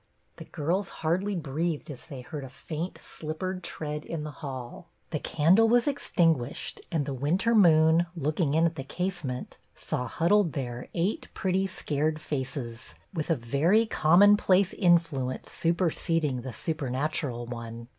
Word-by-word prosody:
The - - -9
girls 175 +7 -1 0.2
hardly 190 +5 +1
breathed 160 0 -2
as 130 - -11
they 135 -5 -7
heard 145 +2 -7
a 135 - -8
faint, 160 +6 -5
slippered 185 +4 -5
tread 150 -1 -4
in 160 -3 -5
the 150 - -5
hall. 135 +1 -7 0.2
The 155 - -1
candle 180 +12 +4
was 240 +3 +4
extinguished, 165 - 0
and 160 -5 0
the 140 - -3
winter 165 - +1
moon, 165 -4 +5
looking 155 -1 0
in 165 +1 +4
at 165 -1 -1
the 135 - -3
casement, 150 -5 -4 0.2
saw 125 - -3
hud 170 +3 0
dled 205 -7 +4
there 125 -3 -4
eight 180 +5 -1
pretty, 190 +1 +1
scared 155 -3 -1
faces, 130 -5 -4 0.2
with 160 -3 -3
a 165 - +4
very 150 - +2
commonplace 195 +1 +5
influence 165 -8 +1
superseding 165 -5 0
the 130 +1 -6
supernatural 140 -3 -2
one. 115 -1 -7
155 Hz, 145 wpm, -28 LUFS, 135-175 Hz, 0.2 s, moon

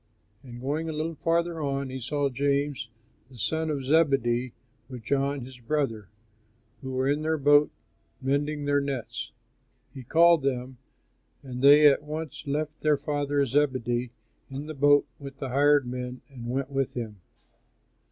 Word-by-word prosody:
And 120 -2 -10
going 150 +5 -2
a - - -3
little 155 +2 -2
farther 165 +1 0
on, 140 -2 -2
he 130 0 -6
saw 145 +3 0
James, 140 -1 -1 0.4
the 130 - -15
son 160 +7 -1
of 140 -3 -2
Zebedee, 130 -5 +2 0.4
with 125 -3 -8
John 140 +3 0
his 130 -1 -12
brother, 120 -5 -2 0.7
who 130 -1 -6
were 130 +1 0
in 145 +2 +1
their 160 +1 0
boat 145 +1 +5 0.5
mending 145 +2 -1
their 145 0 +2
nets. 130 -5 -4 0.6
He 135 - -8
called 165 +5 +5
them, 130 -2 -3 0.6
and 125 -2 -6
they 145 +2 +8
at 145 -1 +6
once 155 0 -6
left 150 +2 -2
their 150 -1 +2
father, 145 -1 0
Zebedee, 125 -3 0 0.4
in 135 +2 -6
the 155 - -6
boat 145 0 +4
with 140 -1 -9
the 135 - -5
hired 145 +1 +4
men, 125 0 -5
and 120 -3 -8
went 135 +2 -2
with 135 -1 -1
him. 110 -5 -6
140 Hz, 155 wpm, -27 LUFS, 130-150 Hz, 0.7 s, they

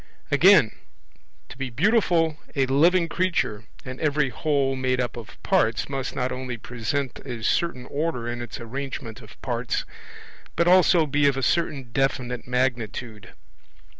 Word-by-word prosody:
Again: 160 - +6 0.8
to - - -11
be 135 -1 -3
beautiful, 165 - +2 0.2
a 135 -2 +3
living 165 +7 +3
creature, 165 - -1 0.2
and 130 0 -7
every 150 -2 +1
whole 140 -2 0
made 130 -1 0
up 125 -1 -2
of 115 -3 -10
parts, 115 +2 +2
must 135 -1 -3
not 125 0 -1
only 125 -1 -4
present 125 +4 -3
a 120 -4 -7
certain 130 -1 0
order 140 -4 -2
in 120 0 -4
its 120 - -7
arrangement 120 -1 -6
of - - -15
parts, - - -2 0.7
but 170 - +2
also 180 -2 +5
be 145 0 +2
of 140 -1 +2
a 135 - -2
certain 140 -5 0
definite 125 -2 -1
magnitude. 120 -4 -2
135 Hz, 145 wpm, -24 LUFS, 120-155 Hz, 0.8 s, Again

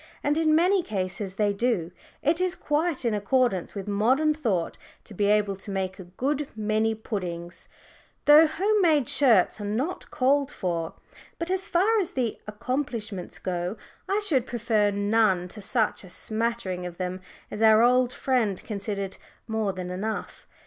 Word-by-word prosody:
And 290 +1 +2
in 315 -1 +3
many 365 +4 +4
cases 190 - -3
they 205 0 +1
do. 200 -6 0 0.3
It 320 +4 +2
is 370 0 0
quite 305 -3 -1
in 230 - +2
accordance 210 -2 0
with 200 0 -5
modern 255 +10 +2
thought 220 - -2 0.2
to 215 - -12
be 205 +1 0
able 205 -1 +2
to 195 - -8
make 190 0 -3
a 185 - -8
good 270 +11 -2
many 220 +1 0
"puddings," 175 -6 -6 0.6
though 300 +2 +8
home 405 +7 +1
made 305 -7 +3
shirts 225 -7 +3
are - - -4
not 240 - -3
called 275 +2 +2
for. 170 -3 -3 0.4
But 335 +2 -3
as 380 +1 0
far 405 +5 +3
as 370 - -2
the 245 -4 -2
"accomplishments" 220 -4 -4
go, 180 +2 -3 0.3
I 400 +2 +1
should 265 - +1
prefer 225 -3 +1
none 205 -2 +2
to 210 - -7
such 220 +1 +1
a 185 - -12
smattering 220 -3 -2
of 175 -1 -10
them 185 0 -4 0.3
as 210 - -5
our 220 0 +6
old 250 0 +4
friend 240 -8 0
considered 200 -2 -4 0.3
more 220 -3 -1
than 180 -1 -6
enough. 210 +4 -5
220 Hz, 165 wpm, -26 LUFS, 195-280 Hz, 0.6 s, though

